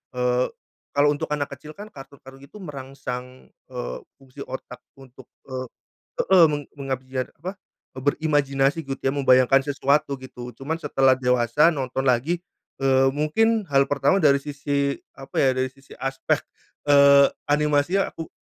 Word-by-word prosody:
eee, 125 0 +1 0.5
kalau 145 +1 +4
untuk 145 - -3
anak 145 -1 -2
kecil 145 +3 -10
kan 210 +2 -10
kartun-kartun 135 -2 -13
itu 210 - -22
merangsang, 130 -3 -8 0.2
eee, 125 -1 -5 0.2
fungsi 135 0 -18
otak 130 -1 -8 0.2
untuk, 130 -1 -16 0.2
e 130 -1 -5 0.5
heeh, 185 -3 +6
meng 145 0 -2
mengabiar 130 -2 -4
apa, 185 +6 -6 0.4
berimajinasi 140 +1 +1
gitu 135 -1 -5
ya 135 - 0
membayangkan 135 -1 +4
sesuatu 140 0 0
gitu 125 -1 -9
cuman 145 +4 -3
setelah 135 -3 +3
dewasa 125 +4 +3
nonton 135 -2 -3
lagi, 135 +7 +1 0.4
eee, 135 0 +4
mungkin 220 +10 +2
hal 135 0 +4
pertama 145 +7 +2
dari 140 -4 +4
sisi 140 -1 -2 0.2
apa 135 - -13
ya 135 - +4
dari 130 0 0
sisi 135 0 -17
aspek, 135 +1 -1 0.5
eee, 140 -1 +7 0.2
animasinya 150 +5 +1
aku 165 - -7
135 Hz, 140 wpm, -23 LUFS, 130-145 Hz, 0.5 s, eee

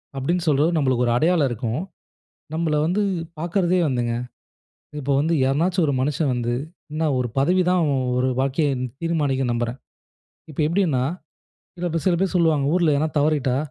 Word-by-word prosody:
அப்பிடின்னு 170 +6 -1
சொல்ற 145 +2 +3
நம்மளுக்கு 130 -4 +1
ஒரு 120 - +2
அடையாளம் 160 -2 +2
இருக்கும். 120 +5 -2 0.7
நம்மள 160 -2 0
வந்து 180 +6 +1 0.4
பார்க்கறதே 175 +2 +1
வந்துங்க 120 -3 -1 0.9
இப்போ 140 0 -1
வந்து 160 +3 +1
யாரனாச்சும் 165 +7 +1
ஒரு 140 - +1
மனுஷன் 145 +1 0
வந்து 120 -1 -1 0.4
என்ன 160 +1 -1
ஒரு 125 - -1
பதவிதான் 180 +4 +3
அவன் 140 -4 +1 0.2
ஒரு 130 - +1
வாழ்க்கைய 140 +3 +1 0.3
தீர்மானிக்கிது 145 -6 0
நம்புறேன். 120 +1 -2 0.7
இப்போ 155 - -10
எப்பிடின்னா 160 -6 +1 0.7
சில 175 0 -3
பேர் 165 - -2
சில 175 - +3
பேர் 195 -1 0
சொல்லுவாங்க. 160 -5 +2
ஊர்ல 170 -4 +3
எதுனா 150 +3 +1
தவறிட்டா, 145 -4 +1
150 Hz, 150 wpm, -22 LUFS, 130-170 Hz, 0.9 s, சொல்ற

